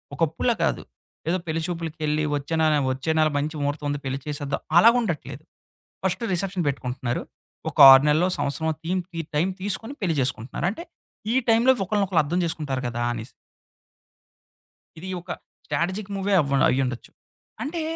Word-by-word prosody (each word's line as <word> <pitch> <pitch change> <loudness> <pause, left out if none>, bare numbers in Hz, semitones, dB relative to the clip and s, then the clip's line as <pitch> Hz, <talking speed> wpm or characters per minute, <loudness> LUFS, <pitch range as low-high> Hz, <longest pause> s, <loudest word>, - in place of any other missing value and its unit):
ఒకప్పుడల 165 +10 +1
కాదు - - 0 0.5
ఏదో 180 - +2
పెళ్లి 160 +1 -1
చూపులకెళ్ళి, 155 -3 -2
ఒచ్చే 145 +3 -3
నా - - +4 0.3
వచ్చే 135 +5 -2
నెల 155 - +4
మంచి 155 +2 -2
మహుర్తం 145 +1 -2
ఉంది 145 0 -2
పెళ్లి 135 +1 -2
చేసేద్దా 145 -1 -3 0.2
అలాగా 230 +7 +7
ఉండట్లేదు. 155 - -4 0.6
ఫస్ట్ 190 +5 -1
రిసెప్షన్ 185 0 -1
పెట్టుకుంటున్నారు, 125 -2 -2 0.5
ఒక - - -14
6 135 +1 +8
నెలలో, 160 +5 +3
సంవత్సరమొ 160 +3 -1
తీమ్ 185 +2 0
తీ 165 - -5 0.2
టైం 165 +5 +2
తీసుకొని 225 +6 -2
పెళ్లి 175 -5 0
చేసుకుంటున్నారు. 125 +3 -2
అంటే, 335 - -6 0.5
ఈ - - +1
టైం‌లో 230 +3 +5
ఒకళ్ళని 205 +1 +1
ఒకకళ్ళ 180 -4 +2
అర్థం 175 +5 -1
జేసుకుంటారు 145 -5 -2
కదా! 120 0 -4
అనేసి. 115 -1 -7 1.7
ఇది 185 +4 -7
ఒక 175 - -8 0.3
స్ట్రాటజిక్ 190 +4 -2
మూవే 195 +1 0
అవ్వ 140 -2 0
అయ్యుండొచ్చు. 130 -2 -2 0.5
అంటే 320 +4 -3
160 Hz, 150 wpm, -24 LUFS, 140-190 Hz, 1.7 s, 6